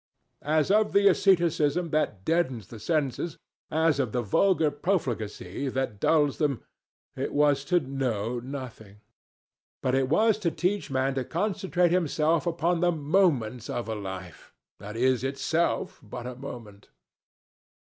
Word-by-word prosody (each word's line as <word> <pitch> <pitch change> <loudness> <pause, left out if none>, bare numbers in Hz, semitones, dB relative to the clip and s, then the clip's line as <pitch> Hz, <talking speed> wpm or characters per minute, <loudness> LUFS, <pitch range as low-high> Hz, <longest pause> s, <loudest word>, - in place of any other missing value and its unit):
Of 160 +8 +2
the 200 0 +5
asceticism 170 -4 +2
that 105 -11 -1
deadens 130 - 0
the 115 - -9
senses, 150 +4 -1 0.3
as 160 -2 +2
of 125 -6 -1
the 125 -1 0
vulgar 160 - +2
profligacy 135 - -2
that 130 -5 -3
dulls 145 -1 +2
them, 145 -6 0 0.5
it - - -3
was 145 -2 +3
to 180 +1 +3
know 125 -5 -2
nothing. 120 -6 -8 0.8
But 130 - +1
it 135 -1 +1
was 215 +6 +3
to 180 -5 +1
teach 180 +4 -1
man 135 0 0
to 130 -1 -1
concentrate 180 0 0
himself 165 -1 +1
upon 170 +1 +1
the 175 0 +3
moments 145 - +1
of 120 - -3
a 110 - -2
life 95 -4 -8 0.3
that 105 +2 -8
is 130 0 +2
itself 140 +5 -1
but 120 +2 -8
a 125 - -5
moment. 120 -6 -10
140 Hz, 140 wpm, -27 LUFS, 120-170 Hz, 0.8 s, the